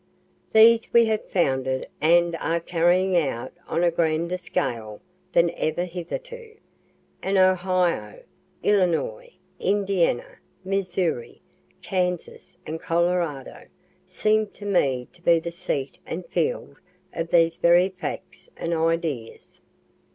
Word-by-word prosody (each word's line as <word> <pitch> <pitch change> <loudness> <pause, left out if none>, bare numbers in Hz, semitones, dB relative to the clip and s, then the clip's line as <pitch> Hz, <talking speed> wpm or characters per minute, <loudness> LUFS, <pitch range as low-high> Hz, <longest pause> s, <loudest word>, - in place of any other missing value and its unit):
These 225 +1 +6
we 235 -1 +7
have 220 -1 -2
founded 130 -6 0
and 170 +2 +4
are 165 +1 -1
carrying 175 +2 +2
out 135 -7 -1
on 170 - 0
a 175 - +4
grander 170 +1 0
scale 125 - -3 0.3
than 170 -2 +3
ever 175 +2 -2
hitherto, 450 - -7 0.7
and 195 +1 0
Ohio, 185 - +1 0.4
Illinois, 210 - +1 0.3
Indiana, 195 -9 0 0.3
Missouri, 185 -8 -2 0.4
Kansas 180 -2 -3
and 160 +1 -5
Colorado, 170 -5 -1 0.4
seem 215 0 +1
to 205 - -12
me 135 -11 +1
to 175 - -21
be 170 -1 +4
the 170 +1 -4
seat 165 -6 -4
and 175 +2 -5
field 155 -4 -2 0.4
of 165 0 -3
these 165 -1 +3
very 175 +2 +4
facts 185 - -7
and 170 - -2
ideas. 160 -7 -2
175 Hz, 115 wpm, -24 LUFS, 165-190 Hz, 0.7 s, we